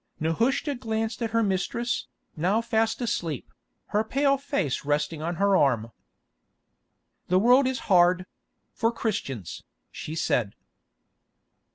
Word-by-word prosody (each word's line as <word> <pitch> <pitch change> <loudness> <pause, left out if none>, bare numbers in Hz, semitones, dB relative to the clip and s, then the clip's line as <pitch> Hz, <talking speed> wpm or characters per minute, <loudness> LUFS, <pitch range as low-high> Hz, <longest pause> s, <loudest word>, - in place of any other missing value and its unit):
Nehushta 230 - +1
glanced 225 -2 -3
at 230 - 0
her 230 0 +2
mistress, 220 +5 -1 0.3
now 185 +7 +1
fast 225 0 0
asleep, 165 - -3 0.4
her 210 +1 +1
pale 275 +5 +2
face 275 - -2
resting 150 +2 -1
on 170 +2 -2
her 200 +2 +3
arm. 115 -8 +2 1.4
"The 180 - +3
world 250 +6 +5
is 260 -2 -2
hard—for 185 +5 +1
Christians," 140 - -4 0.3
she 155 - -6
said. 115 -9 0
205 Hz, 110 wpm, -26 LUFS, 160-235 Hz, 1.4 s, world